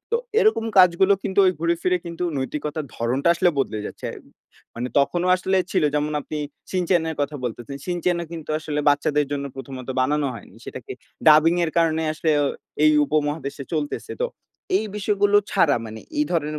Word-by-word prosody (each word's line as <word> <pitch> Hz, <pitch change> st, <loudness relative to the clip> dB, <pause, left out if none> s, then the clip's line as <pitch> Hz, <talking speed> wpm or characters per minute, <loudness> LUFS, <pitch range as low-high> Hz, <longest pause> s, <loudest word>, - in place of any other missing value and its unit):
তো -, -, +5 dB, 0.2 s
এরকম 435 Hz, -, +3 dB
কাজগুলো 185 Hz, +2 st, +6 dB
কিন্তু 190 Hz, -1 st, -2 dB
ঐ -, -, +6 dB
ঘুরে 170 Hz, 0 st, +2 dB
ফিরে 180 Hz, 0 st, +2 dB
কিন্তু 170 Hz, +1 st, -4 dB
নৈতিকতার 150 Hz, +2 st, -3 dB
ধরনটা 125 Hz, +7 st, 0 dB
আসলে 175 Hz, +1 st, +3 dB
বদলে 115 Hz, -5 st, -1 dB
যাচ্ছে। -, -, -7 dB, 0.7 s
মানে 120 Hz, +2 st, -3 dB
তখনও 175 Hz, +6 st, +1 dB
আসলে 190 Hz, +1 st, 0 dB, 0.2 s
ছিল 180 Hz, -5 st, +2 dB
যেমন 150 Hz, +1 st, 0 dB
আপনি 155 Hz, -, -6 dB, 0.3 s
'Shin-chan' 180 Hz, -2 st, +1 dB
এর 160 Hz, -, -6 dB
কথা 145 Hz, +1 st, -3 dB
বলতেছেন। 120 Hz, +3 st, -5 dB
'Shin-chan' 175 Hz, 0 st, 0 dB
ও -, -, -4 dB
কিন্তু 160 Hz, -3 st, -7 dB
আসলে 150 Hz, -1 st, -3 dB
বাচ্চাদের 145 Hz, 0 st, +2 dB
জন্য 140 Hz, -1 st, -2 dB
প্রথমত 135 Hz, -1 st, -8 dB
বানানো 145 Hz, +3 st, +1 dB
হয়নি। -, -, -12 dB
সেটাকে -, -, -8 dB, 0.4 s
ডাবিং 155 Hz, +2 st, +6 dB
এর 160 Hz, -, -2 dB
কারণে 160 Hz, -1 st, +2 dB
আসলে 160 Hz, +1 st, -1 dB, 0.5 s
এই 155 Hz, -, +6 dB
উপমহাদেশে 145 Hz, -2 st, -2 dB
চলতেছে। 150 Hz, -2 st, -3 dB
তো -, -, +2 dB, 0.5 s
এই 220 Hz, -, 0 dB
বিষয়গুলো 205 Hz, 0 st, +2 dB
ছাড়া 145 Hz, -4 st, +3 dB
মানে 110 Hz, 0 st, -8 dB, 0.2 s
এই 300 Hz, -, +3 dB
ধরনের 155 Hz, -2 st, -1 dB
155 Hz, 170 wpm, -23 LUFS, 145-180 Hz, 0.7 s, কাজগুলো